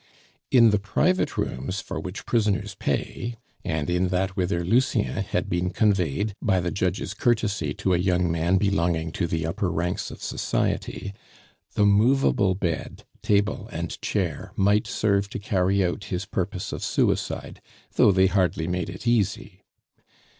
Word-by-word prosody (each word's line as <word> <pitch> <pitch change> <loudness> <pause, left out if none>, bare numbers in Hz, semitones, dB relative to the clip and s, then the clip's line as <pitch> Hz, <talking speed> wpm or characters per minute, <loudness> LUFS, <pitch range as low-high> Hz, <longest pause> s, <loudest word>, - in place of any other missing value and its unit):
In 115 -4 +6
the 105 - +2
private 180 - +1
rooms 90 +10 -2
for - - -5
which 95 +2 -7
prisoners 105 -3 0
pay, 115 +6 -3 0.3
and 80 -2 -2
in 90 +1 +1
that 90 +1 -1
whither 90 -2 0
Lucien 115 - +1
had - - -2
been 90 +1 0
conveyed 100 -1 +1
by 95 -3 +2
the 90 0 -2
judge's 95 +1 -1
courtesy 105 -9 0
to 95 - 0
a 85 - +2
young 90 -2 +1
man 85 +3 +2
belonging 85 -5 +1
to 85 0 -1
the 80 -1 -1
upper 85 +3 -1
ranks 90 +3 -2
of - - -10
society, 100 - -2 0.6
the 105 - +4
movable 105 -2 +3
bed, 85 -4 -3 0.2
table, 105 0 +1
and - - -5
chair - - -2
might 100 +2 +3
serve 100 -2 +1
to - - -5
carry 95 -1 +1
out 90 +4 -3
his 95 -1 -3
purpose 95 0 -3
of - - -5
suicide, - - -1 0.3
though 105 - +5
they 95 0 +4
hardly 90 -4 +1
made 90 +2 -2
it 95 +3 -8
easy. 105 -4 0
95 Hz, 155 wpm, -25 LUFS, 90-105 Hz, 0.6 s, In